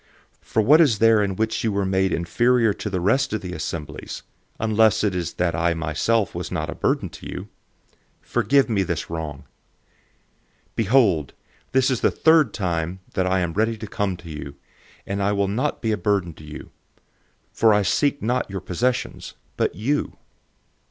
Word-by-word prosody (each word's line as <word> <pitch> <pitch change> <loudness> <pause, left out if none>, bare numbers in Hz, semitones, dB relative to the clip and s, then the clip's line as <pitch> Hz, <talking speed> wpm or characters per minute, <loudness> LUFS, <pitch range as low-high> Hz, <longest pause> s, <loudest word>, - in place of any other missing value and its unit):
012:013 - - -34
For 110 - +2
what 150 +9 +6
is 135 -10 +4
there 110 0 +5
in 100 -2 -1
which 110 +2 -1
you 110 - +1
were 100 -1 0
made 95 0 +1
inferior 115 +7 +2
to 105 - -5
the 95 -2 -2
rest 130 +10 +1
of 110 - -1
the 90 -1 -6
assemblies, 75 -2 -6 0.4
unless 110 0 +3
it 105 -2 +1
is 90 -2 -3
that 85 -1 0
I 85 +2 +1
myself 80 +8 0
was - - -5
not - - -2
a - - -4
burden - - 0
to - - -10
you? - - -7 0.7
Forgive 140 0 +2
me 110 -5 +1
this 85 -3 -3
wrong. 80 -4 -5 1.3
012:014 - - -42
Behold, 105 - +2 0.4
this 130 0 +3
is 125 - -1
the - - +4
third 160 -7 +4
time 90 -2 -2 0.2
I 95 0 +1
am 85 -2 -2
ready 110 +3 0
to 110 - -7
come 100 -3 -2
to 85 -1 -12
you, 70 -2 -7 0.5
and 100 +1 -3
I 100 +1 +1
will 100 -1 +1
not 125 +10 -2
be 110 - +1
a 105 - 0
burden 100 -5 0
to 75 - -15
you; 75 0 -10 0.8
for 115 - +4
I 105 -1 +3
seek 145 - +1
not 125 +1 0
your 95 0 -4
possessions, 125 +9 -2 0.2
but - - 0
you. 130 +10 -1
100 Hz, 185 wpm, -23 LUFS, 90-115 Hz, 1.3 s, what